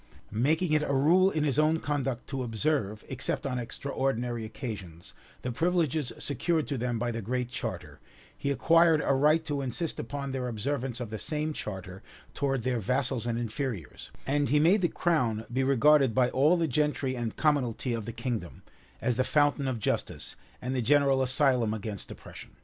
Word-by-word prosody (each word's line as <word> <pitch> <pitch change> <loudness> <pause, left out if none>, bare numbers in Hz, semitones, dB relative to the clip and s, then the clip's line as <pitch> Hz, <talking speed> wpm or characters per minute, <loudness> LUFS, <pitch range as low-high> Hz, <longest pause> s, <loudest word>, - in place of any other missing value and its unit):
Making 155 - +1
it 150 - +4
a 140 -2 0
rule 175 +8 +5
in 155 -5 -1
his 145 -1 +1
own 155 +1 +4
conduct 135 -5 -2
to 135 -2 -3
observe, 115 -3 -1
except 135 0 -1
on 125 -2 -1
extraordinary 120 -2 -2
occasions, 100 - -7 0.3
the 125 - -2
privileges 160 -1 0
secured 155 +3 0
to 140 - -1
them 120 0 -1
by 120 +1 -1
the 115 0 -4
Great 125 +3 -2
Charter, 125 - -5 0.4
he 140 - -3
acquired 165 +2 +4
a - - +3
right 150 +4 +3
to 145 -2 -2
insist 145 +5 -3
upon 140 -1 -4
their 130 -1 -2
observance 125 +2 -3
of 115 -3 -5
the 110 - -4
same 155 +6 -2
charter 95 -6 -6 0.3
towards 135 -4 -1
their 125 -1 0
vassals 125 +1 0
and 115 -1 -1
inferiors; 115 - -4 0.2
and 145 -1 +1
he 150 +3 +4
made 180 +7 +4
the 175 - +3
crown 125 -12 0
be 130 +2 +1
regarded 135 -1 +4
by 125 -1 +3
all 150 +7 +4
the 165 -1 +1
gentry 145 -1 0
and 120 -3 -4
commonalty 130 -5 +1
of 115 -2 -5
the 115 - -4
kingdom, 115 - -4 0.4
as 125 -1 0
the 130 - +3
fountain 145 -1 +2
of 130 -2 -1
justice, 110 - -2 0.3
and 130 +1 -2
the 125 - +1
general 140 +1 +3
asylum 130 -4 +2
against 105 -2 -5
oppression. - - -11
130 Hz, 180 wpm, -29 LUFS, 120-150 Hz, 0.4 s, rule